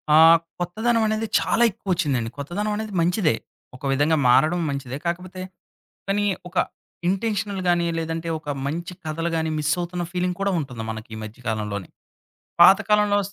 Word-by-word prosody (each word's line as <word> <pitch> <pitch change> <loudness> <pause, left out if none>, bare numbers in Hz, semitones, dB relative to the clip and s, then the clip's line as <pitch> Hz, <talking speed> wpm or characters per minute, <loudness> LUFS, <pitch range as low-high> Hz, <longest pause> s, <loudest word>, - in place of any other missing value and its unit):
ఆహ్, 165 +1 +8 0.2
కొత్తదనం 220 +6 +1
అనేది 215 +1 -1
చాలా 235 - +2
ఎక్కువ 195 - -22
వచ్చిందండి. 140 -9 0
కొత్తదనం 175 +9 -3
అనేది 215 -1 -5
మంచిదే. 175 - +2 0.4
ఒక 130 - -15
విధంగా 145 +4 +2
మారడం 155 +8 +4
మంచిదే. 140 -2 -4
కాకపోతే, 180 +2 -4 0.7
కానీ 205 +1 +1 0.2
ఒక 180 - -18 0.5
ఇంటెన్షనల్ 200 0 -1
గాని, 175 -1 +3
లేదంటే 165 0 -3
ఒక 155 -1 -14 0.2
మంచి 170 +5 -3
కథలు 165 +2 -2
గాని 160 0 0
మిస్ 150 0 +1
అవుతున్న 175 0 -3
ఫీలింగ్ 180 0 -1
కూడా 200 0 +1
ఉంటుంది 125 -6 -6
మనకి 110 +1 -7
ఈ - - -7
మధ్య 110 +2 -10
కాలంలోని. 105 -3 -3 0.7
పాత 195 - +9
కాలంలో 210 -1 +4
వస్ 200 +1 -7
170 Hz, 160 wpm, -23 LUFS, 145-195 Hz, 0.7 s, పాత